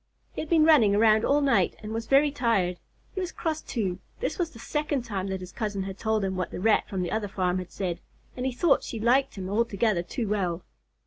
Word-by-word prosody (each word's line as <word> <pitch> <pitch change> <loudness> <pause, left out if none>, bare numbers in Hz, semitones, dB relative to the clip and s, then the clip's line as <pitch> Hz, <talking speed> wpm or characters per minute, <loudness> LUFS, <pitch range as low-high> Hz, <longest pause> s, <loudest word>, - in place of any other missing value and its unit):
He - - -4
had 310 - -7
been 325 -2 +5
running 240 -11 +6
around 220 +1 +4
all 290 +1 +3
night, 280 -2 +2
and 215 +1 -5
was 225 0 -4
very 285 +2 +4
tired. 225 -10 0 0.3
He - - -4
was 365 -1 -3
cross, 315 -2 -3
too. 195 -6 -3 0.2
This - - -3
was 345 -2 0
the 245 - -14
second 295 +1 -2
time 200 -4 -3
that 190 -1 -3
his 180 0 -8
cousin 210 -4 -3
had 195 0 -7
told 220 -2 0
him 190 0 -2
what 185 -2 -2
the - - -6
Rat 215 +3 +2
from 190 -3 -2
the 175 - -3
other 215 -1 -1
farm 185 -2 -1
had 180 - -8
said, 175 -3 -3 0.4
and 255 +1 -2
he - - 0
thought 280 +4 +3
she 230 - -5
liked 255 +5 +2
him 190 -2 -5
altogether 215 -2 +1
too 225 +6 -4
well. 185 -4 -1
220 Hz, 240 wpm, -27 LUFS, 190-270 Hz, 0.4 s, running